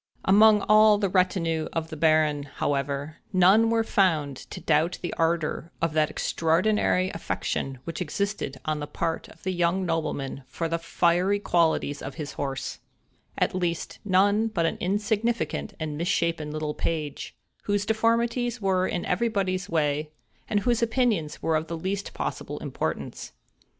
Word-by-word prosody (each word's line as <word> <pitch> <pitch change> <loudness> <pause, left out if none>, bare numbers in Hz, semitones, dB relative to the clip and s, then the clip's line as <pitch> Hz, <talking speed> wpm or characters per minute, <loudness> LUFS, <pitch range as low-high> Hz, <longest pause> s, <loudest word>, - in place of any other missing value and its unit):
Among 210 +2 +6
all 215 0 +6
the 200 -2 0
retinue 175 -4 +1
of 160 -1 -3
the - - -4
Baron, 155 -2 +3
however, 140 +2 -2
none 195 +4 +5
were 225 0 +2
found 160 -10 +1
to - - -7
doubt 160 +4 +1
the 175 - -3
ardor 165 0 -1
of 165 -2 0
that 155 -1 +2
extraordinary 185 +3 +1
affection 135 -4 -3
which 165 +4 -5
existed 180 -5 -2
on 155 -1 -1
the 145 - -4
part 165 +2 -3
of 160 - -18
the 185 - -1
young 175 +2 +1
nobleman 155 -5 -2
for 165 - -3
the 165 +1 -1
fiery 175 +4 +2
qualities 165 -6 +1
of 135 0 -6
his 150 -2 -5
horse; 135 -2 -4 0.6
at - - +1
least, 175 -2 -2
none 205 +3 +3
but 185 -7 0
an 165 - -1
insignificant 215 +3 -1
and 155 -2 -4
misshapen 170 -3 0
little 155 0 -3
page, 150 -4 -3 0.3
whose 205 0 0
deformities 230 +2 +1
were 190 -2 +1
in 175 - -2
everybody's 190 -2 0
way, 150 -2 0 0.4
and 205 -1 +1
whose 240 +1 +1
opinions 225 - 0
were 160 - +2
of 155 +1 -1
the 165 - -4
least 195 +4 -3
possible - - -4
importance. - - -4
170 Hz, 150 wpm, -26 LUFS, 155-205 Hz, 0.6 s, Among